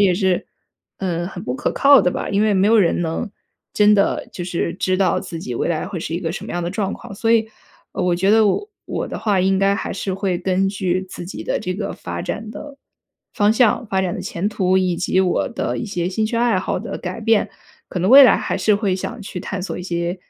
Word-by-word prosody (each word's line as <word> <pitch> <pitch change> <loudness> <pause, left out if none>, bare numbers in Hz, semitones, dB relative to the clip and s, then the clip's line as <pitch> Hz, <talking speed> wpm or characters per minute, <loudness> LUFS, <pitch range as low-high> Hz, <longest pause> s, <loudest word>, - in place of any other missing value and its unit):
也 195 -3 +5
是， 185 -1 +1 0.5
呃， 175 -3 -2
很 185 - -8
不 - - -3
可 285 - -1
靠 280 0 +6
的 180 - +2
吧。 - - -4
因 200 +1 +1
为 215 -1 +3
没 190 +1 +3
有 225 +2 +5
人 180 -5 +3
能 165 +7 -3 0.4
真 210 0 +5
的 200 -1 +1
就 175 - -5
是 170 -1 -2
知 185 0 0
道 185 -3 +2
自 175 -3 -7
己 125 -6 -5
未 - - -1
来 165 -1 -1
会 185 -3 -5
是 160 - -5
一 - - -1
个 165 -2 -2
什 - - -6
么 - - -8
样 175 - -2
的 170 - -2
状 200 0 -2
况。 - - -9
所 225 +3 -1
以， 225 -1 +3 0.4
呃 - - -3
我 180 -1 +1
觉 190 +3 +2
得 220 0 +5
我 405 - 0 0.2
我 - - -3
的 - - -6
话 205 -4 0
应 190 +1 +2
该 195 0 +3
还 - - -4
是 190 0 -3
会 190 -1 -1
根 190 +1 +1
据 185 -1 -1
自 175 - -8
己 180 - -7
的 - - -1
这 185 - -3
个 200 +1 -4
发 85 0 -6
展 215 +1 -5
的 290 +2 -9 0.6
方 205 0 +3
向、 230 +1 +3
发 190 -1 +1
展 185 -2 -1
的 - - -5
前 180 +4 -2
途， 190 -3 +1
以 185 -2 +1
及 185 - +1
我 185 -2 +1
的 235 - -3
一 - - -3
些 180 -5 -2
兴 215 +4 -1
趣 225 +2 -2
爱 235 -3 +2
好 - - -2
的 - - -5
改 185 +4 -5
变， 225 -1 +2 0.4
可 - - -4
能 180 +2 +1
未 275 +4 +10
来 260 - +7
还 - - -2
是 210 -2 +2
会 200 -3 0
想 230 +5 -5
去 190 -3 -6
探 190 +2 -4
索 190 - -4
一 - - -6
些， 175 0 -2
190 Hz, 275 characters per minute, -20 LUFS, 180-210 Hz, 0.6 s, 未